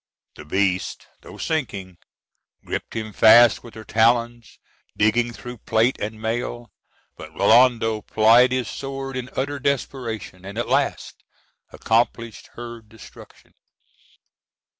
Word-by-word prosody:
The 75 - -12
beast, 95 +3 -1 0.2
though - - -13
sinking, 100 - -4 0.7
griped - - -5
him 110 -1 -5
fast 120 +3 +6
with 120 - -13
her 110 - -9
talons, 115 +1 +1 0.4
digging 115 +3 +2
through 120 0 -10
plate 115 +5 +1
and 110 +1 -5
mail; 120 +1 -4 0.5
but - - -10
Rinaldo 115 -3 +3
plied 115 +4 +4
his 130 -2 -1
sword 135 -1 -6
in 125 -1 -5
utter 140 +2 -2
desperation, 125 -8 -3
and 100 +3 -9
at 120 - -2
last - - -1 0.5
accomplished 115 -1 -1
her 120 -1 -8
destruction. 110 0 -16
115 Hz, 120 wpm, -22 LUFS, 110-125 Hz, 0.7 s, fast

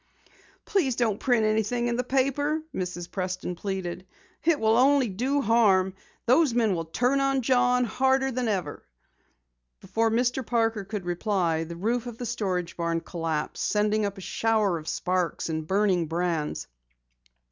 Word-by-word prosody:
"Please 320 - +1
don't 225 -4 0
print 240 -4 +2
anything 220 +3 +1
in 240 0 0
the 250 - 0
paper," 275 +4 0
Mrs. 180 -1 -4
Preston 185 -1 -3
pleaded. 185 -1 -4 0.4
"It 320 -2 +3
will 220 0 +3
only 265 0 +4
do 260 +9 0
harm. 200 -5 +3 0.3
Those 255 +1 +4
men 225 -4 +3
will 165 -2 -2
turn 250 - +1
on 275 -1 +1
John 250 0 +3
harder 265 +2 +1
than 250 -1 -2
ever." 185 -9 -2 1.0
Before 225 - 0
Mr. 245 +3 +1
Parker 225 -3 0
could 205 -2 -5
reply, 175 -3 0
the 170 +1 -7
roof 230 +7 -1
of 235 -2 -7
the 245 - -5
storage 190 -7 -2
barn 170 -1 -1
collapsed, 165 -4 -3
sending 210 +1 +1
up 200 0 -2
a - - -8
shower 215 -3 +1
of 155 - -12
sparks 180 -3 -1
and 160 -1 -3
burning 190 -3 +2
brands. 165 -2 -2
215 Hz, 155 wpm, -26 LUFS, 180-245 Hz, 1.0 s, only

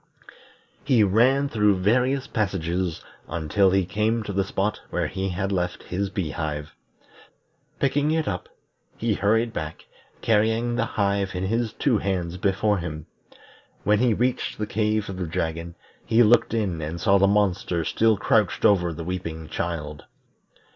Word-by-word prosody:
He 125 -6 +4
ran 125 +8 +3
through 105 -5 +2
various 125 +8 +2
passages 90 -5 -2 0.2
until 85 +5 +2
he 95 -1 +2
came 110 +5 0
to 100 - -5
the 95 +1 +1
spot 100 +2 -2
where - - -1
he 95 0 -3
had 95 +2 -2
left 90 -2 -2
his 100 +2 -2
bee 95 -5 -3
hive. 75 -1 -4 1.1
Picking 145 +2 +1
it 160 0 0
up, 90 -3 -3 0.5
he 115 -1 0
hurried 110 +4 +1
back, 80 -4 -6 0.4
carrying 115 +2 +2
the 115 -1 0
hive 100 -2 0
in 90 - -2
his 115 +2 -1
two 125 -7 +1
hands 90 -3 -2
before 100 +1 +1
him. 80 -3 -6 0.8
When 105 +1 +3
he 120 -2 +3
reached 125 +3 -1
the 105 - -2
cave 105 0 0
of 95 - -6
the 90 -2 -3
dragon, 85 +1 -3 0.3
he 115 +2 +4
looked 115 +1 +4
in 95 -8 -1
and 80 +3 -4
saw 100 +2 +4
the 100 - +5
monster 95 -4 +1
still 110 +4 +2
crouched 105 -2 +1
over 90 -4 +4
the 85 +1 -6
weeping 80 -3 -5
child. 75 -4 -4
100 Hz, 155 wpm, -24 LUFS, 90-110 Hz, 1.1 s, the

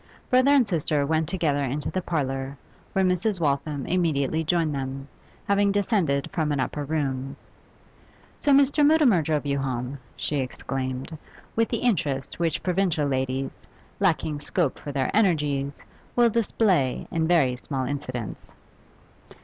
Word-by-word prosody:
Brother 255 +2 +5
and 280 -5 +5
sister 155 -5 0
went 160 +1 0
together 150 -6 0
into 140 +3 -2
the 185 - -1
parlour, 135 -4 -2 0.4
where 190 0 +2
Mrs. 185 +2 +1
Waltham 140 -2 -1
immediately 160 -3 +1
joined 160 -1 +1
them, 135 0 -4 0.4
having 200 0 +3
descended 190 - +1
from 160 -5 0
an 145 - 0
upper 145 +3 -2
room. 135 -2 -2 1.0
'So 290 - +1
Mr. 280 +2 +5
Mutimer 290 - +5
drove 150 -1 -1
you 140 -1 0
home!' 130 0 -3 0.2
she 150 - -2
exclaimed, 130 +2 -4 0.4
with 230 0 +2
the - - 0
interest 145 - 0
which 165 -3 0
provincial 180 -4 +1
ladies, 130 0 -2 0.3
lacking 160 -6 +1
scope 150 0 -1
for 145 - -6
their 135 -2 0
energies, 145 -9 +1 0.4
will 240 -1 +5
display 200 - +1
in 160 -1 0
very 150 -8 +3
small 130 +1 -3
incidents. 130 -5 -5
150 Hz, 140 wpm, -25 LUFS, 135-185 Hz, 1.0 s, Brother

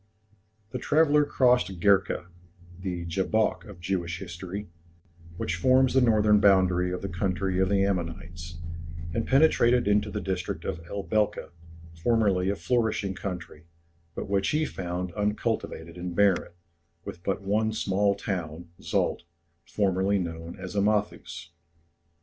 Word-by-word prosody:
The 125 - -3
traveller 150 +2 +4
crossed 125 -10 +2
Gerka 100 -1 +3 0.5
the 90 -2 -4
Jabok 95 +5 0
of 100 -4 -11
Jewish 85 -1 -2
history 95 +2 -6 0.7
which 85 - -2
forms 130 +7 +4
the 130 - +4
northern 105 -3 +4
boundary 90 -3 +4
of 90 - -4
the - - -1
country 95 0 -1
of 95 -1 +2
the 100 -1 +3
Ammonites, 85 -2 -4 0.6
and 115 - -1
penetrated 125 -5 +4
into 105 0 +2
the 105 - -3
district 95 -3 -3
of 80 - -3
El 100 -1 -4
Belka, 105 -5 0 0.4
formerly 95 0 +2
a 100 - 0
flourishing 110 -4 0
country, 90 -5 -7 0.5
but - - -4
which 100 -1 +1
he 155 +1 +1
found 90 - -4
uncultivated 105 -5 -2
and 90 0 -5
barren, 100 -3 +2 0.5
with 85 - -7
but 95 +1 -2
one 110 +3 +1
small 100 -1 +1
town, 85 -3 -4
Szalt, - - 0 0.5
formerly 100 0 +1
known 85 -2 -5
as 95 0 -6
Amathus. 100 -5 -1
95 Hz, 130 wpm, -27 LUFS, 90-105 Hz, 0.7 s, traveller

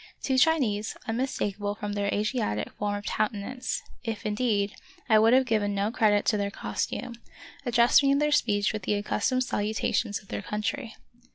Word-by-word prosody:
Two 265 -1 +2
Chinese, 250 -10 +2
unmistakable 210 -4 -2
from 210 -1 -4
their 200 0 -1
Asiatic 210 - -1
form 205 0 -2
of 205 0 -6
countenance, 215 +4 -2 0.2
if, 225 -3 -4
indeed, 210 -2 0 0.3
I 220 -3 +6
would 225 +1 +5
have 260 0 +5
given 210 -4 0
no 200 +2 0
credit 210 -3 +3
to 210 - +2
their 200 0 -1
costume, 235 +3 -4 0.5
addressed 240 +2 +5
me 275 - +2
in 275 - +4
their 300 +1 +2
speech 210 -8 +2
with 215 - -3
the 205 - 0
accustomed 215 +5 0
salutations 215 -1 -1
of 195 - -21
their - - -3
country. 220 +3 -3
215 Hz, 170 wpm, -27 LUFS, 205-245 Hz, 0.5 s, I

